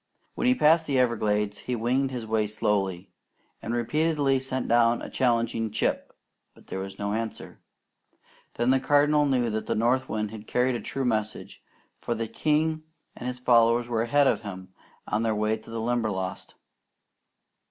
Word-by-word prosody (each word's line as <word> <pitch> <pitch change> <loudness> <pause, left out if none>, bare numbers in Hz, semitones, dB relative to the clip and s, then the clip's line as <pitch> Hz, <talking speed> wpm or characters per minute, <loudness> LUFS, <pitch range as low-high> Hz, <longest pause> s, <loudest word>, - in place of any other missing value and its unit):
When - - -1
he 255 - +5
passed 160 -5 +4
the 140 -2 +1
Everglades, 105 -4 +1
he 125 - -3
winged 125 +4 0
his 125 -3 -5
way 110 -1 0
slowly, 95 -3 -1 0.5
and 115 - -4
repeatedly 140 +3 +1
sent 130 -1 -3
down 120 0 +3
a - - -8
challenging 115 -3 0
"Chip," 105 - -1 0.4
but - - -19
there 95 - -5
was 95 0 -7
no 100 0 -2
answer. 115 0 -5 1.0
Then 120 +2 +2
the 135 - +4
Cardinal 145 +2 +3
knew 125 -4 +1
that 110 0 -3
the - - 0
north 120 +4 +1
wind 105 -1 -2
had 110 -1 -10
carried 125 +1 +1
a 120 - -3
true 135 -1 -3
message, 110 -3 -3 0.4
for 120 - -2
the 115 0 -3
king 155 +4 0 0.3
and 125 - -6
his 125 0 -3
followers 120 -1 +3
were 115 -2 0
ahead 140 +5 +3
of - - +2
him 95 -2 -9 0.3
on 105 - 0
their 110 -1 0
way 105 +1 +1
to 110 - -13
the 115 0 -4
Limberlost. 110 -5 -2
115 Hz, 175 wpm, -26 LUFS, 110-130 Hz, 1.0 s, he